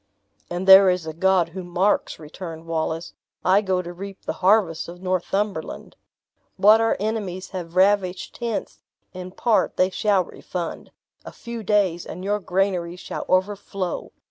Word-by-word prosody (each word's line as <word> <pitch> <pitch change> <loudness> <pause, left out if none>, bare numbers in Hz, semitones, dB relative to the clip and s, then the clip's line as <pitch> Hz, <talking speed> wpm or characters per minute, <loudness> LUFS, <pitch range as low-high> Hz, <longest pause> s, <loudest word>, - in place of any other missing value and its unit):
"And 175 +2 -4
there 190 0 +9
is 180 -2 0
a 160 - -5
God 185 0 +2
who 185 +2 -7
marks," 180 +3 0
returned 165 +1 -9
Wallace; 165 0 -3 0.3
"I 190 +2 +5
go 185 -3 0
to 175 0 -7
reap 195 +2 -9
the - - -2
harvests 185 -4 +3
of 175 +1 -10
Northumberland. 185 0 -2 0.6
What 210 +3 +6
our 225 - +2
enemies 205 -3 -3
have 175 -3 -7
ravished 190 -1 +2
hence 235 -3 -4 0.3
in 185 0 -7
part 220 +4 +1
they 185 +1 +3
shall 200 -1 +2
refund; 175 0 -6 0.3
a - - -9
few 235 -1 -7
days, 195 -5 +1
and 180 - -7
your 205 +2 0
granaries 180 -2 -1
shall - - -6
overflow. 190 -1 -1
185 Hz, 150 wpm, -23 LUFS, 175-200 Hz, 0.6 s, there